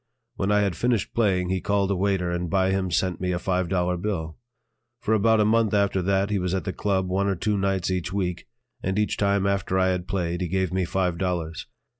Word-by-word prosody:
When 95 +1 -1
I 105 0 +4
had 100 -4 0
finished 120 0 0
playing, 95 -6 +1
he 95 -1 0
called 100 -1 +1
a - - +2
waiter 95 -2 0
and 85 0 -2
by 95 +1 +2
him 95 -1 0
sent 90 0 0
me 90 0 0
a 90 - 0
five 90 -1 -1
dollar 90 -1 0
bill. 85 -5 -3 0.6
For 110 -1 0
about 110 +1 +4
a 105 - +4
month 110 0 +2
after 100 -2 +2
that 100 +2 +1
he 100 - +1
was 90 0 -1
at 95 - -2
the 95 - -3
"Club" 95 -3 0
one 95 +2 0
or 100 - +1
two 105 +4 0
nights 95 -2 0
each 90 -1 -2
week, 90 -3 -2 0.3
and 95 +2 -2
each 105 0 +1
time 100 -1 +1
after 100 -1 0
I 95 0 +3
had 90 -1 -2
played, 90 -2 -2
he 90 - -1
gave 95 +1 -1
me 95 -1 +1
five 90 -1 -1
dollars. 85 -2 -2
95 Hz, 235 wpm, -25 LUFS, 90-100 Hz, 0.6 s, I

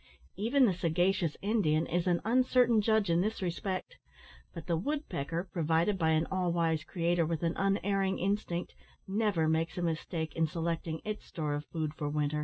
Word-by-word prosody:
Even 255 +6 +3
the 200 - +3
sagacious 175 0 +1
Indian 190 -7 +2
is 175 +2 -1
an 175 -1 +2
uncertain 245 -1 +4
judge 220 -3 +2
in 170 +1 +3
this 215 +3 -1
respect, 185 +1 -3 0.5
but 165 - -8
the 170 - +1
woodpecker, 170 - -2
provided 165 +3 +1
by 160 -2 +2
an 160 0 +3
all 185 -2 +1
wise 165 -2 +1
Creator 170 0 0
with 165 0 -2
an 165 0 0
unerring 195 0 +1
instinct, 190 -2 -2 0.3
never 195 -5 +1
makes 160 +2 0
a - - -1
mistake 160 -1 -2
in 165 -1 +2
selecting 165 0 -3
its 215 0 -5
store 150 -3 -3
of 145 +1 -3
food 155 -2 -3
for 150 -1 -3
winter. 150 0 0
170 Hz, 175 wpm, -31 LUFS, 160-195 Hz, 0.5 s, uncertain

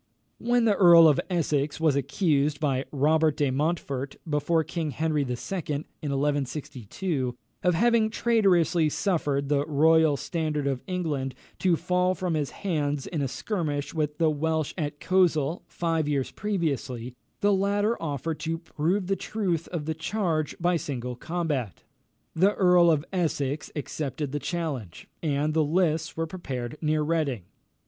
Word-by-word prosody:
When 240 0 +2
the 215 - +4
Earl 170 -4 +8
of 150 - +4
Essex 150 -5 0
was 155 -3 +3
accused, 145 -1 +1
by 135 -3 0
Robert 155 +2 +2
de 145 -3 +1
Montfort, 140 -2 -2
before 155 +2 +1
King 160 -1 -3
Henry 155 0 0
II., 135 - -3 0.4
in 150 0 -5
1162, 140 - -2 0.3
of 180 -1 +2
having 230 +3 +3
traitorously 180 -9 +3
suffered 145 -6 0
the 140 0 +2
royal 160 0 +4
standard 155 -3 -2
of 135 -3 -1
England 155 -8 -2 0.2
to 180 -3 +3
fall 180 +2 +1
from 180 -1 -2
his 150 -3 -1
hands 150 -7 -2
in 160 -4 -3
a 135 - 0
skirmish 145 - -3
with 150 -2 -1
the 160 -2 +3
Welsh 155 0 -1
at 145 -4 -3
Coleshill, 170 -4 +2
five 165 -3 -1
years 140 -3 -1
previously, 140 - -2 0.3
the 205 0 +4
latter 205 +3 +1
offered 155 0 -3
to 165 +1 -2
prove 170 +3 -1
the 195 +2 0
truth 185 -7 -2
of 165 -4 -4
the 160 - -1
charge 160 -2 -1
by 175 0 +2
single 125 -5 -4
combat. 150 - -3 0.5
The 190 +5 +3
Earl 180 -2 +5
of 155 -2 +2
Essex 150 -5 -1
accepted 145 -1 -4
the 145 - -2
challenge, 145 - -4
and 150 -1 0
the 160 0 +3
lists 160 -1 0
were 165 - 0
prepared 140 -7 -5
near 155 -1 +1
Reading. 150 - -1
155 Hz, 150 wpm, -27 LUFS, 145-175 Hz, 0.5 s, Earl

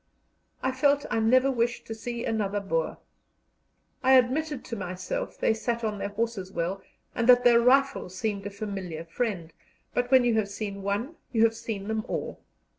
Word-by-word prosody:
I 260 - +1
felt 285 +2 +2
I - - +1
never 255 +4 +4
wished 235 -1 -1
to 225 - -5
see 235 +1 -5
another 205 -2 0
Boer. 165 -5 -1 1.0
I 265 0 +5
admitted 265 +3 +2
to 230 - -5
myself 195 - -4
they - - +2
sat 235 +1 -2
their 210 -3 -2
horses 205 -3 -3
well 180 +2 -2 0.3
and 230 +1 0
that 245 0 +8
their 240 -1 +6
rifle 270 -2 +3
seemed 200 +1 -3
a - - -4
familiar 195 -5 -5
friend, 170 -3 -3 0.4
but 245 0 0
when 260 -1 +6
you 240 - +3
have 200 -2 -2
seen 200 -1 -5
one 205 +11 -2
you 225 -2 +3
have 225 0 +4
seen 210 -3 -5
them 220 0 -1
all. - - -4
225 Hz, 175 wpm, -27 LUFS, 200-245 Hz, 1.0 s, that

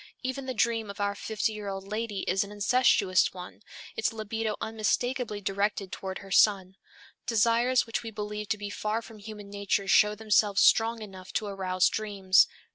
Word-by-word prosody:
Even 260 +1 -4
the 260 - -3
dream 225 -1 0
of 200 - -8
our 200 0 0
fifty 220 +2 -2
year 210 -1 -7
old 195 0 -5
lady 210 -1 -3
is 190 +2 +1
an 200 - -10
incestuous 205 -3 +3
one, 180 +2 -10 0.3
its 220 - 0
libido 220 0 -3
unmistakably 225 0 -1
directed 200 0 -1
toward 190 0 -5
her 195 - -12
son. 190 -2 +3 0.5
Desires 235 +3 +3
which 230 - -3
we 230 - -6
believe 210 -1 -5
to 220 - 0
be 205 0 -6
far 215 +3 -2
from 225 -1 -13
human 205 -1 -10
nature 200 -1 -1
show 210 +2 +5
themselves 210 -2 +2
strong 225 0 +4
enough 190 -3 -11
to 215 - -1
arouse 185 -2 +1
dreams. 200 -3 +3
210 Hz, 175 wpm, -28 LUFS, 200-225 Hz, 0.5 s, show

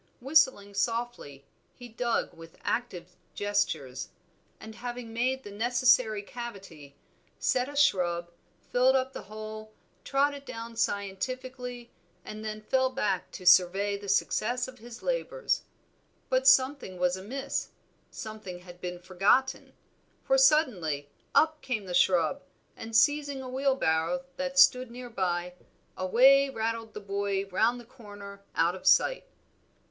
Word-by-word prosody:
Whistling 260 -7 +2
softly 230 - -3 0.3
he 245 - -10
dug 235 0 -1
with 165 0 -14
active 185 -7 -3 0.2
gestures; 160 -11 -1 0.5
and, 220 - -10
having 240 0 -7
made 260 +3 0
the 205 - -9
necessary 235 -1 +2
cavity, 195 - -9 0.4
set 255 +1 0
a 290 - -9
shrub, 175 -11 +2 0.4
filled 255 +2 +4
up 260 0 0
the - - -6
hole, 215 +1 -8 0.3
trod 280 +1 +2
it 280 -1 -9
down 230 -3 -8
scientifically, 245 +4 -3 0.3
and 215 0 -7
then 215 0 -5
fell 260 +3 +2
back 205 -8 -1
to 185 - -9
survey 190 +3 +5
the 200 0 -7
success 245 +5 +1
of 260 -1 -12
his 235 +1 -11
labors. - - -1 0.7
But - - +2
something 265 - +4
was 180 0 +1
amiss, 235 +9 -4 0.4
something 215 -5 -8
had 180 0 -14
been 180 0 -4
forgotten, 195 +9 +1 0.5
for 270 - +2
suddenly 205 - +2 0.2
up 315 0 +3
came 220 -6 -3
the 180 - -6
shrub, 180 - +3 0.3
and 225 0 -7
seizing 285 +1 +3
a - - -7
wheelbarrow 265 -5 0
that 275 0 -3
stood 255 -2 +6
near 245 0 -9
by, 180 -3 -2 0.4
away 265 +9 +5
rattled 225 -2 -3
the 210 - -6
boy 200 0 -2
round 220 +6 +2
the 240 - -12
corner 205 -5 -12
out 170 +2 +2
of 190 - -7
sight. - - +4
225 Hz, 135 wpm, -28 LUFS, 190-260 Hz, 0.7 s, stood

